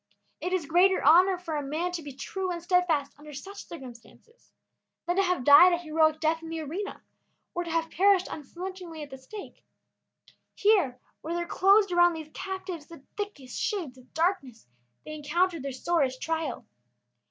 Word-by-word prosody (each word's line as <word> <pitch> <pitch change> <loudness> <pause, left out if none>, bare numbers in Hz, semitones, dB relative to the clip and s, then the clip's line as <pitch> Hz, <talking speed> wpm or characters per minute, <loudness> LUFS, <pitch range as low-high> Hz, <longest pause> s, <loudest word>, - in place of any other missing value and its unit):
It 360 - -3
is 370 -4 0
greater 360 +5 +3
honor 360 +6 +6
for 340 -3 -5
a 295 - -1
man 310 +6 -2
to 350 -2 -4
be 290 -2 -8
true 370 +7 -4
and 345 - -3
steadfast 340 -5 +1
under 300 0 -11
such 395 +9 -9
circumstances 265 - -13 0.5
than 350 +1 0
to - - +5
have 360 -8 0
died 295 +7 +8
a - - +2
heroic 315 -2 +1
death 320 +1 +1
in 325 - -8
the 325 0 -4
arena 360 +8 -5 0.5
or 350 - -2
to 340 - -7
have 325 0 -1
perished 385 0 +4
unflinchingly 345 +1 -7
at 290 - -11
the 265 - -9
stake. 395 +10 -11 0.9
Here, 370 - +3 0.2
where 330 +2 -4
there 345 0 -1
closed 395 +3 +4
around 350 0 +5
these 315 -1 -8
captives 375 -5 -6
the 330 -5 -13
thickest 355 -12 -6
shades 350 - -2
of 255 0 -19
darkness, 320 - -1 0.4
they 310 - -7
encountered 330 +3 0
their 275 +1 -4
sorest 265 -1 0
trial. 325 +1 -3
335 Hz, 175 wpm, -28 LUFS, 295-365 Hz, 0.9 s, died